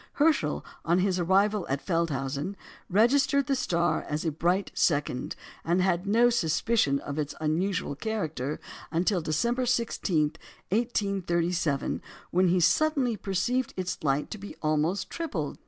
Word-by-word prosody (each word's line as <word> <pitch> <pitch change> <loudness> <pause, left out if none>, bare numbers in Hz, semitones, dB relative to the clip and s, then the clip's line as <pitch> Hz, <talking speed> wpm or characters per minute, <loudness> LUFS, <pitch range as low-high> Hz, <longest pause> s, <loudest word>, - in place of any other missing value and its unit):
Herschel, 290 - +2 0.2
on 170 +2 +2
his 185 0 +1
arrival 195 +2 +2
at 135 +1 0
Feldhausen, 155 0 -1 0.3
registered 275 +7 +3
the 275 - +1
star 170 -9 +1
as 150 +3 -2
a 160 - +1
bright 175 +5 0
second, 145 -5 0 0.3
and 170 +2 +1
had 185 0 +1
no 235 +4 +4
suspicion 195 -6 +2
of 145 +1 -5
its 150 -1 -3
unusual 160 +1 -1
character 155 - -3 0.3
until 175 +3 +1
December 235 +12 0
16, 190 -10 +1 0.4
1837, 180 - 0 0.3
when 185 +1 +3
he 180 +1 +3
suddenly 270 - +3
perceived 210 +6 -1
its 180 -3 -3
light 140 0 0
to 215 - -5
be 205 - -8
almost 155 +5 +1
tripled. 190 - -3
180 Hz, 135 wpm, -28 LUFS, 155-220 Hz, 0.4 s, no